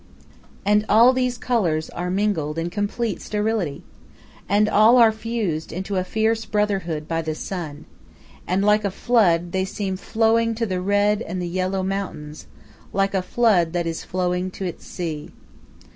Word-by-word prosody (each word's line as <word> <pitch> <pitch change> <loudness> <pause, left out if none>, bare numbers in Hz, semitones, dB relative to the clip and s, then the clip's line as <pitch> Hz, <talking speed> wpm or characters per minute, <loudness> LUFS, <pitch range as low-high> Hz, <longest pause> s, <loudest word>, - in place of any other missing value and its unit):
And 210 +1 +3
all 235 +4 +7
these 250 -1 0
colors 185 -11 0
are 180 +1 -4
mingled 180 -6 -1
in 165 +1 -2
complete 205 +3 -2
sterility. 210 -8 -2 0.7
And 205 +2 +3
all 215 +4 +5
are 230 -2 +7
fused 220 -8 -3
into 190 +3 -4
a 185 - +1
fierce 220 +3 0
brotherhood 195 -8 -1
by 165 0 -1
the 155 -1 -3
sun. 155 -5 -6 0.6
and 190 +2 +1
like 210 0 +4
a 200 - +1
flood, 180 -6 +2
they 190 +1 0
seem 190 -1 -3
flowing 225 +2 +1
to 230 +1 -1
the 185 -3 -2
red 205 +2 +2
and 185 -4 -4
the 175 - -3
yellow 185 +2 -1
mountains, 175 -6 -5 0.4
like 195 0 0
a 190 - +1
flood 185 -5 +2
that 175 -1 -1
is 165 -1 -3
flowing 180 0 -1
to 190 +1 -6
its 175 - -6
sea. 160 -4 -5
195 Hz, 160 wpm, -22 LUFS, 175-215 Hz, 0.7 s, all